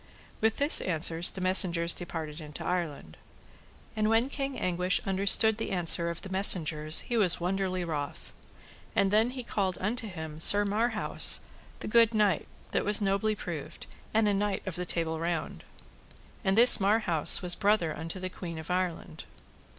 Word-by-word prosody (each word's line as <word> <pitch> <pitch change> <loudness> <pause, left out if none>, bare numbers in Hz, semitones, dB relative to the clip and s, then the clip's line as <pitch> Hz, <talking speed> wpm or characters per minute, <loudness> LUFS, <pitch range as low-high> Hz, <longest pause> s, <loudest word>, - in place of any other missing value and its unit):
With 220 0 +1
this 285 +2 +3
answer 165 -1 -1
the 185 +2 +1
messengers 180 -2 +3
departed 160 -3 -7
into 150 -1 -9
Ireland. 160 - -5 0.8
And 215 0 0
when 225 +4 +1
King 275 -1 -5
Anguish 180 0 -1
understood 200 +3 +3
the - - -4
answer 170 -2 +3
of 170 0 -8
the 195 - -8
messengers 160 -5 +3
he 240 - -4
was 190 -6 +3
wonderly 185 0 -3
wroth. 150 -3 -6 0.6
And 200 -3 +1
then 220 +3 +2
he 255 0 -8
called 195 -5 -3
unto 225 +4 -3
him 160 -5 -9
Sir 205 +5 +5
Marhaus, 215 +2 +1 0.4
the - - -6
good 230 0 +3
knight, 205 -5 0 0.2
that - - -1
was 210 0 +5
nobly 205 +2 -1
proved, 155 -5 -8 0.3
and 220 0 +1
a 205 - +1
Knight 200 0 -2
of 185 -4 -6
the 180 0 -6
Table 160 -2 -3
Round. 170 0 -5 0.8
And 195 0 0
this 240 +2 +8
Marhaus 195 -5 +3
was 180 -1 +1
brother 195 -5 0
unto 165 +4 -7
the 185 - -5
queen 170 -3 -8
of 160 +2 -8
Ireland. 180 -2 -4
185 Hz, 165 wpm, -28 LUFS, 170-210 Hz, 0.8 s, this